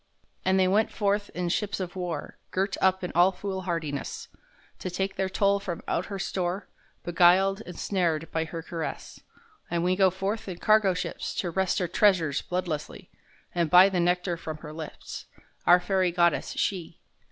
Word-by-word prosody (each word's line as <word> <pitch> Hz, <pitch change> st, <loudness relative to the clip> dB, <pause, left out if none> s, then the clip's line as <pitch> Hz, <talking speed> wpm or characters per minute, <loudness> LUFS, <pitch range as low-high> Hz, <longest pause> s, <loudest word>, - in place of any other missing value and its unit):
And 190 Hz, +1 st, +3 dB
they 185 Hz, -, +4 dB
went 210 Hz, +4 st, +2 dB
forth 205 Hz, 0 st, 0 dB
in 175 Hz, -1 st, -1 dB
ships 205 Hz, +3 st, -1 dB
of 180 Hz, -1 st, -5 dB
war 175 Hz, -5 st, -5 dB
Girt 195 Hz, +1 st, -1 dB
up 190 Hz, 0 st, +3 dB
in 180 Hz, -, -3 dB
all 175 Hz, +3 st, +5 dB
foolhardiness, 180 Hz, -7 st, -4 dB, 0.5 s
To -, -, -4 dB
take 190 Hz, +2 st, -2 dB
their 190 Hz, -1 st, -1 dB
toll 200 Hz, +1 st, +2 dB
from 180 Hz, -4 st, -5 dB
out 175 Hz, -, -1 dB
her 200 Hz, -, -5 dB
store, 185 Hz, 0 st, -2 dB, 0.4 s
Beguiled 185 Hz, +3 st, +4 dB
and 180 Hz, -, -8 dB
snared 165 Hz, -5 st, -1 dB
by 160 Hz, 0 st, 0 dB
her 165 Hz, 0 st, -6 dB
caress; 165 Hz, -1 st, -6 dB, 0.5 s
And 170 Hz, -1 st, 0 dB
we 180 Hz, +1 st, +2 dB
go 190 Hz, 0 st, +5 dB
forth 195 Hz, +4 st, -3 dB
in 180 Hz, -3 st, -5 dB
cargo 210 Hz, -1 st, +4 dB
ships -, -, -4 dB
To 175 Hz, -, -2 dB
wrest 190 Hz, +1 st, 0 dB
her 180 Hz, -, 0 dB
treasures 170 Hz, -7 st, +3 dB
bloodlessly, 175 Hz, -4 st, -4 dB, 0.4 s
And 170 Hz, -2 st, +1 dB
buy 180 Hz, +4 st, +8 dB
the 185 Hz, -2 st, -1 dB
nectar 175 Hz, 0 st, +1 dB
from 155 Hz, -2 st, -6 dB
her 150 Hz, -, -7 dB
lips, 155 Hz, -1 st, -8 dB, 0.4 s
Our 175 Hz, +1 st, +8 dB
fairy 185 Hz, 0 st, +1 dB
goddess, 170 Hz, -1 st, +2 dB
she! 175 Hz, -4 st, -2 dB
180 Hz, 175 wpm, -27 LUFS, 170-195 Hz, 0.5 s, buy